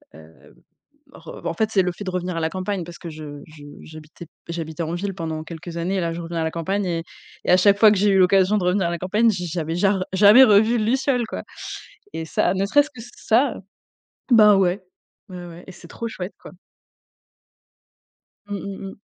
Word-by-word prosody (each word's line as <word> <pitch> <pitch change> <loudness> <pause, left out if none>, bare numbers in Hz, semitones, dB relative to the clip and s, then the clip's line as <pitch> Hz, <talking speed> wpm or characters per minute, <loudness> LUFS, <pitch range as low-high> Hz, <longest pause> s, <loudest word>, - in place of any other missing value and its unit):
heu, - - -13
hem, 80 +1 -19 0.6
re - - -12
en 165 - -1
fait, 220 +3 0
c'est 190 -3 +3
le 180 -1 -2
fait 205 - -9
de 185 - -3
revenir 180 -1 -3
à 165 - -2
la 160 - 0
campagne 185 0 -3
parce 175 0 -11
que 170 - -8
je 150 -2 -9
je 155 -2 -14 0.2
j'habitais 155 +2 -12 0.2
j'habitais 165 0 -5
en 165 +1 -3
ville 195 +2 -4
pendant 160 -2 -5
quelques 165 +1 -9
années 185 +3 -1
là, 170 -1 -2
je 170 - -6
reviens 170 0 -5
à - - -1
la 160 - -1
campagne 190 +5 -2
et 170 -2 -2 0.4
et - - 0
à 180 - +7
chaque 200 +2 +4
fois 215 -1 +7
que 205 - +2
j'ai 205 +1 +3
eu 195 - +3
l'occasion 190 +2 +4
de 185 - -3
revenir 180 +1 +1
à - - -2
la 170 - -3
campagne, 210 +6 +2
j 180 -4 -3
j - - -7
j'avais 165 0 -3
jare 190 0 +1
jamais 210 +7 +8
revu 220 +1 +4
de 215 - 0
luciole 255 0 +1
quoi, - - -6 0.7
et 160 - -5
ça, 175 - +1
ne 195 +1 0
serait-ce 290 +7 +3
que 255 - -12 0.2
ça 245 +4 +1 0.7
bah 210 -4 +7
ouais, 185 0 +1 0.5
ouais 180 -1 -8
ouais, 170 +1 -12
et 190 - -10
c'est - - -15
trop 230 - -6
chouette 185 -3 -7
quoi. - - -12 2.0
Mmh, 205 - -4
mmh, 195 0 -7
mmh. - - -17
185 Hz, 225 wpm, -22 LUFS, 170-205 Hz, 2.0 s, jamais